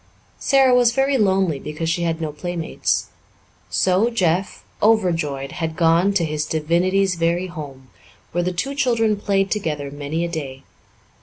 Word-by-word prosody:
Sara 270 Hz, -2 st, +4 dB
was 245 Hz, -1 st, +4 dB
very 270 Hz, +2 st, +2 dB
lonely 190 Hz, -7 st, +2 dB
because 150 Hz, +3 st, -5 dB
she 170 Hz, +2 st, 0 dB
had 165 Hz, -1 st, -1 dB
no 155 Hz, -2 st, -3 dB
playmates. 165 Hz, +2 st, -2 dB, 0.6 s
So 185 Hz, -, +2 dB
Jeff, 185 Hz, -5 st, -1 dB, 0.2 s
overjoyed, 165 Hz, -11 st, +1 dB
had 160 Hz, -1 st, -4 dB
gone 170 Hz, +3 st, +3 dB
to 170 Hz, -4 st, +2 dB
his 150 Hz, -1 st, -2 dB
divinity's 180 Hz, +5 st, +1 dB
very 170 Hz, +1 st, 0 dB
home, 140 Hz, -8 st, -9 dB, 0.4 s
where 175 Hz, +1 st, 0 dB
the 180 Hz, -, -1 dB
two 225 Hz, +11 st, -3 dB
children 235 Hz, -6 st, +1 dB
played 195 Hz, -1 st, 0 dB
together 150 Hz, -9 st, -2 dB
many 145 Hz, +4 st, -3 dB
a -, -, -2 dB
day. 140 Hz, -5 st, -6 dB
170 Hz, 150 wpm, -21 LUFS, 155-195 Hz, 0.6 s, Sara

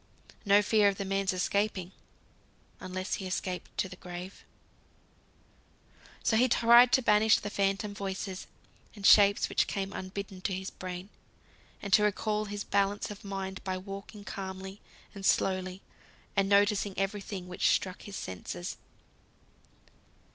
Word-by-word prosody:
No 205 Hz, +1 st, +5 dB
fear 210 Hz, 0 st, +4 dB
of 195 Hz, -, -4 dB
the 200 Hz, -, -3 dB
man's 195 Hz, 0 st, 0 dB
escaping, 190 Hz, 0 st, -1 dB, 0.9 s
unless 185 Hz, +1 st, -4 dB
he 190 Hz, -, -3 dB
escaped 185 Hz, 0 st, -4 dB
to -, -, 0 dB
the 180 Hz, -, -10 dB
grave. 180 Hz, +2 st, -8 dB, 1.8 s
So 225 Hz, -2 st, +3 dB
he 255 Hz, +3 st, +4 dB
tried 235 Hz, +1 st, +7 dB
to 260 Hz, -, +4 dB
banish 210 Hz, 0 st, +5 dB
the 205 Hz, -, -5 dB
phantom 200 Hz, +1 st, 0 dB
voices 190 Hz, -1 st, -5 dB, 0.5 s
and 200 Hz, -2 st, -7 dB
shapes 200 Hz, 0 st, +6 dB
which -, -, +1 dB
came 195 Hz, -1 st, -3 dB
unbidden 190 Hz, 0 st, -6 dB
to 190 Hz, -, -1 dB
his 190 Hz, +1 st, -5 dB
brain, 185 Hz, +1 st, -7 dB, 0.7 s
and 200 Hz, -1 st, -3 dB
to -, -, +7 dB
recall 210 Hz, +1 st, 0 dB
his 205 Hz, 0 st, -5 dB
balance 200 Hz, +1 st, 0 dB
of 205 Hz, -, -10 dB
mind 190 Hz, -1 st, -5 dB
by 185 Hz, -1 st, -2 dB
walking 195 Hz, +2 st, -8 dB
calmly 190 Hz, 0 st, -7 dB, 0.3 s
and 200 Hz, -, -9 dB
slowly, 185 Hz, 0 st, +1 dB, 0.5 s
and 195 Hz, -1 st, +2 dB
noticing 200 Hz, -1 st, +3 dB
every 195 Hz, +1 st, -1 dB
thing 190 Hz, -3 st, -6 dB
which 180 Hz, -, +1 dB
struck 185 Hz, -1 st, 0 dB
his 205 Hz, -, -9 dB
senses. 90 Hz, -, -6 dB
195 Hz, 140 wpm, -30 LUFS, 190-205 Hz, 1.8 s, tried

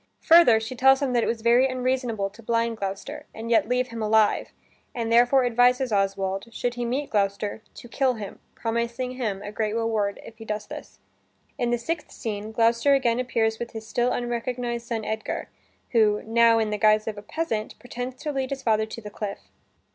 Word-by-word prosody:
Further 325 Hz, -9 st, +7 dB
she 225 Hz, +3 st, -6 dB
tells 265 Hz, +2 st, +5 dB
him 275 Hz, -3 st, -1 dB
that 240 Hz, -1 st, +2 dB
it -, -, 0 dB
was 225 Hz, -1 st, -2 dB
very 240 Hz, +3 st, +5 dB
unreasonable 250 Hz, -5 st, -1 dB
to 215 Hz, +3 st, -15 dB
blind 230 Hz, 0 st, 0 dB
Gloucester 200 Hz, +10 st, -5 dB
and 230 Hz, +1 st, -5 dB
yet 225 Hz, -1 st, +3 dB
leave 250 Hz, 0 st, +1 dB
him 230 Hz, 0 st, -6 dB
alive, 215 Hz, 0 st, +2 dB, 0.5 s
and 230 Hz, -2 st, -2 dB
therefore 245 Hz, +3 st, +5 dB
advises 245 Hz, +1 st, +3 dB
Oswald, 195 Hz, 0 st, 0 dB
should 245 Hz, +1 st, -2 dB
he 245 Hz, 0 st, -3 dB
meet 265 Hz, +5 st, -2 dB
Gloucester, 205 Hz, +1 st, -1 dB
to -, -, -11 dB
kill 255 Hz, +1 st, +1 dB
him, 205 Hz, -3 st, -8 dB, 0.2 s
promising 235 Hz, +2 st, -2 dB
him 215 Hz, -6 st, -3 dB
a 205 Hz, -, -6 dB
great 215 Hz, 0 st, -2 dB
reward 220 Hz, -3 st, -1 dB
if 225 Hz, 0 st, -13 dB
he -, -, -8 dB
does 210 Hz, -1 st, -4 dB
this. -, -, -10 dB, 0.6 s
In 240 Hz, -, +1 dB
the 240 Hz, -, +1 dB
sixth 300 Hz, +6 st, -4 dB
scene, 215 Hz, -2 st, -5 dB
Gloucester 230 Hz, +5 st, +3 dB
again 245 Hz, -3 st, +1 dB
appears 225 Hz, -3 st, 0 dB
with 235 Hz, -, -6 dB
his 220 Hz, -1 st, -7 dB
still 240 Hz, +2 st, 0 dB
unrecognized 240 Hz, 0 st, -3 dB
son 225 Hz, -2 st, -3 dB
Edgar, 220 Hz, 0 st, -4 dB, 0.4 s
who 215 Hz, -3 st, +3 dB
(now 230 Hz, 0 st, +4 dB
in 220 Hz, -1 st, 0 dB
the 210 Hz, -, -2 dB
guise 215 Hz, +1 st, +4 dB
of 220 Hz, -, -3 dB
a -, -, -9 dB
peasant) 220 Hz, -2 st, -3 dB
pretends 245 Hz, +1 st, -6 dB
to 300 Hz, -, -1 dB
lead 265 Hz, -2 st, -2 dB
his 275 Hz, -1 st, -5 dB
father 220 Hz, -2 st, +2 dB
to 230 Hz, -, -8 dB
the 210 Hz, -1 st, -9 dB
cliff. 205 Hz, -1 st, -6 dB
230 Hz, 200 wpm, -25 LUFS, 215-250 Hz, 0.6 s, Further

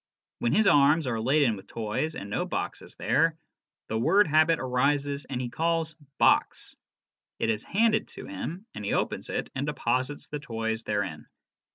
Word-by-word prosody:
When 120 Hz, -, +1 dB
his 215 Hz, +1 st, +4 dB
arms 150 Hz, -1 st, +5 dB
are 115 Hz, -3 st, -1 dB
laden 135 Hz, -1 st, +3 dB
with 95 Hz, -1 st, -12 dB
toys 115 Hz, +8 st, -2 dB
and 100 Hz, -, -6 dB
no 100 Hz, -, -1 dB
box -, -, -3 dB
is -, -, -12 dB
there, 160 Hz, +5 st, +2 dB, 0.5 s
the 110 Hz, -, -1 dB
word 200 Hz, -, +5 dB
habit 155 Hz, +1 st, +4 dB
arises 140 Hz, +2 st, 0 dB
and 130 Hz, -2 st, -4 dB
he 125 Hz, -, -2 dB
calls 165 Hz, +2 st, 0 dB
' 140 Hz, -, -46 dB
box -, -, +2 dB, 0.3 s
'; -, -, -66 dB
it 115 Hz, -, +2 dB
is 105 Hz, -, -2 dB
handed 220 Hz, +1 st, +2 dB
to -, -, -7 dB
him 165 Hz, -, -6 dB
and 105 Hz, -, -7 dB
he 100 Hz, -, -1 dB
opens -, -, -1 dB
it -, -, -3 dB
and 135 Hz, +2 st, -2 dB
deposits 130 Hz, 0 st, -1 dB
the 150 Hz, -, -5 dB
toys 115 Hz, -4 st, -3 dB
therein. 95 Hz, -8 st, -2 dB
140 Hz, 185 wpm, -28 LUFS, 115-155 Hz, 0.5 s, arms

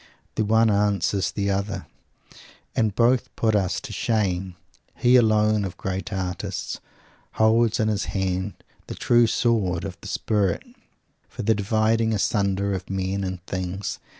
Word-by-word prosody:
The -, -, 0 dB
one 110 Hz, +1 st, +4 dB
answers 100 Hz, -1 st, +1 dB
the 100 Hz, -1 st, -1 dB
other. 95 Hz, -1 st, -2 dB, 0.9 s
And 110 Hz, -3 st, +1 dB
both 120 Hz, +2 st, +3 dB
put 110 Hz, -2 st, +2 dB
us 95 Hz, -3 st, +1 dB
to -, -, -8 dB
shame. 95 Hz, -5 st, -1 dB, 0.4 s
He, 125 Hz, +1 st, +4 dB
alone 110 Hz, -3 st, +4 dB
of 95 Hz, -3 st, -5 dB
great 95 Hz, +1 st, -4 dB
artists, 95 Hz, -2 st, -3 dB, 0.5 s
holds 110 Hz, +1 st, +3 dB
in 110 Hz, -, +2 dB
his 105 Hz, -2 st, 0 dB
hand 95 Hz, 0 st, -2 dB, 0.3 s
the -, -, -6 dB
true 120 Hz, -1 st, +4 dB
sword 105 Hz, -7 st, +1 dB
of -, -, -7 dB
the -, -, -8 dB
Spirit 100 Hz, -5 st, 0 dB, 0.7 s
for -, -, -6 dB
the 110 Hz, +2 st, +4 dB
dividing 110 Hz, +2 st, +1 dB
asunder 100 Hz, -1 st, 0 dB
of 95 Hz, -1 st, -5 dB
men 95 Hz, +1 st, -2 dB
and 95 Hz, -2 st, -5 dB
things. 95 Hz, +2 st, -4 dB
100 Hz, 145 wpm, -24 LUFS, 95-110 Hz, 0.9 s, one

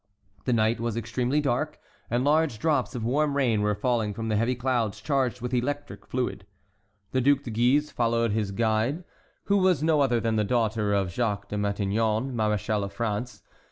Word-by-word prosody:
The 125 Hz, -, +1 dB
night 110 Hz, 0 st, +2 dB
was 115 Hz, -1 st, -2 dB
extremely 125 Hz, +5 st, 0 dB
dark, 145 Hz, +3 st, -1 dB, 0.3 s
and 120 Hz, +2 st, +1 dB
large 150 Hz, -3 st, +2 dB
drops 145 Hz, -1 st, 0 dB
of 120 Hz, -, -3 dB
warm 145 Hz, +3 st, +1 dB
rain 120 Hz, -6 st, +2 dB
were 105 Hz, 0 st, +1 dB
falling 110 Hz, -2 st, 0 dB
from 115 Hz, +1 st, -4 dB
the 110 Hz, -, +1 dB
heavy 115 Hz, +4 st, +1 dB
clouds 120 Hz, -4 st, -1 dB
charged 130 Hz, -4 st, 0 dB
with 125 Hz, +1 st, -4 dB
electric 145 Hz, +4 st, -3 dB
fluid. 120 Hz, -6 st, -3 dB, 0.6 s
The 130 Hz, -, +1 dB
Duc 140 Hz, +2 st, +3 dB
de 120 Hz, -, -6 dB
Guise 125 Hz, +7 st, +2 dB
followed 115 Hz, -1 st, +1 dB
his 105 Hz, -1 st, 0 dB
guide, 115 Hz, -, 0 dB, 0.4 s
who 200 Hz, -, +2 dB
was 185 Hz, -6 st, +3 dB
no 155 Hz, -2 st, +3 dB
other 125 Hz, -4 st, +2 dB
than 115 Hz, -1 st, 0 dB
the 105 Hz, -, +2 dB
daughter 110 Hz, -2 st, 0 dB
of 100 Hz, -3 st, +1 dB
Jacques 100 Hz, -3 st, -1 dB
de -, -, -4 dB
Matignon, 105 Hz, +4 st, 0 dB
maréchal 105 Hz, -2 st, 0 dB
of 100 Hz, -, -5 dB
France. 110 Hz, +3 st, -3 dB
120 Hz, 185 wpm, -26 LUFS, 110-130 Hz, 0.6 s, Duc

